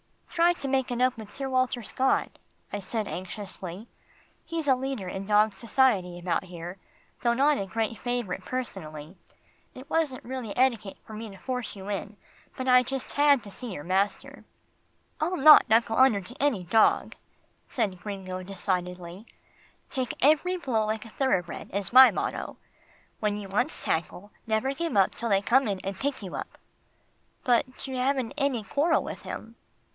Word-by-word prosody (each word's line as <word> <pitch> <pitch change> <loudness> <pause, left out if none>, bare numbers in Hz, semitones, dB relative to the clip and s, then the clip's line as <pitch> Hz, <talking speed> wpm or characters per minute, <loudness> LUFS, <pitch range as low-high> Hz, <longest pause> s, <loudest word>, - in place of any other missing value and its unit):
"Try 345 +1 +3
to 280 - -5
make 265 -1 +1
it 245 -1 -2
up 255 0 +3
with 215 -2 -9
Sir 270 -1 -3
Walter 255 -2 0
Scott," 260 +5 0 0.3
I 205 - -2
said 210 +2 -3
anxiously. 190 +1 -6 0.6
"He's 330 -3 -4
a 270 - +6
leader 260 -6 -4
in 190 +2 -5
dog 210 0 +4
society 205 -5 +1
about 175 +1 -1
here, 175 +1 -8 0.4
though 235 -1 +3
not 285 +3 +3
a 195 - -3
great 225 +2 -2
favourite 245 -6 -3
personally. 170 -10 -6 0.6
It 260 +2 -10
wasn't 305 -6 0
really 250 -4 -5
etiquette 235 -6 +1
for 220 - -11
me 220 +1 -6
to 195 - -12
force 250 +4 -4
you 195 0 -8
in, 205 +1 -4 0.4
but 260 - -4
I 250 0 +7
just 265 +1 -3
had 285 -3 +4
to 200 - -8
see 240 0 -6
your 145 - -6
master." 190 +4 -1 0.8
"I'll 345 +4 0
not 300 -4 +8
knuckle 225 0 +3
under 255 -6 +5
to 235 +7 -11
any 265 -10 +1
dog," 220 +6 +3 0.5
said 205 -7 -2
Gringo 185 -2 -5
decidedly. 180 0 -4 0.6
"Take 255 -2 -2
every 315 +6 +3
blow 240 -10 0
like 220 +1 -2
a - - -10
thoroughbred 190 -9 -1
is 200 +3 -2
my 260 +1 +10
motto, - - -3
but - - -36 0.6
when 210 -1 0
you 205 -1 -6
once 245 +10 -1
tackle, 180 +5 -2 0.2
never 220 +5 +1
give 330 -5 -2
up 190 -1 +5
till 235 - -4
they 195 -1 +3
come 265 +5 +3
in 195 -2 -1
and 195 0 -4
pick 270 +1 -3
you 185 - -7
up." - - -7 0.9
"But 255 +1 +1
you 265 -1 -4
haven't 260 -2 +1
had 285 -1 -1
any 250 -6 -1
quarrel 290 - +1
with - - -7
him. 225 +1 -8
225 Hz, 175 wpm, -27 LUFS, 195-265 Hz, 0.9 s, my